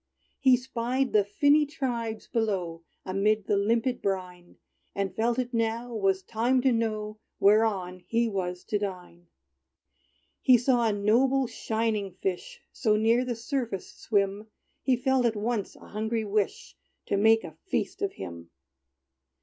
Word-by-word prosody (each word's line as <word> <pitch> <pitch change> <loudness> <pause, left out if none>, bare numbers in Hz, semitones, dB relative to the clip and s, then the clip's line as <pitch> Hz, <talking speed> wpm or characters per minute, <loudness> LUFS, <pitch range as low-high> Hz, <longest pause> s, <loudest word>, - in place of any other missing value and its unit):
He 260 -2 +5
spied 255 +1 -2
the 210 -1 +5
finny 285 +9 +3
tribes 240 -7 -3
below, 190 -8 -1 0.2
Amid 200 +2 +1
the - - +1
limpid 230 +5 +1
brine; 180 -2 -4 0.4
And 195 -2 -2
felt 230 +3 +1
it 250 -1 -2
now 230 +1 -1
was 195 -3 +1
time 235 +6 +1
to 260 0 +3
know 215 -2 -2 0.2
Whereon 200 -3 +3
he 230 +2 +1
was 180 -4 -3
to 210 - -1
dine. 180 -3 -6 1.1
He 255 -1 +6
saw 240 -1 +2
a - - +2
noble, 245 +7 +2
shining 220 -4 -2
fish 185 0 -4
So 220 -5 +1
near 225 +3 +3
the 250 -2 -3
surface 230 -4 -4
swim, 200 0 -1 0.3
He 260 -2 +2
felt 250 0 +2
at 225 - -1
once 215 -1 -2
a - - -15
hungry 220 +1 -2
wish 215 - -2 0.3
To - - 0
make 220 +2 +4
a - - -9
feast - - -2
of 400 -1 -1
him. 85 -1 -8
220 Hz, 145 wpm, -28 LUFS, 200-240 Hz, 1.1 s, He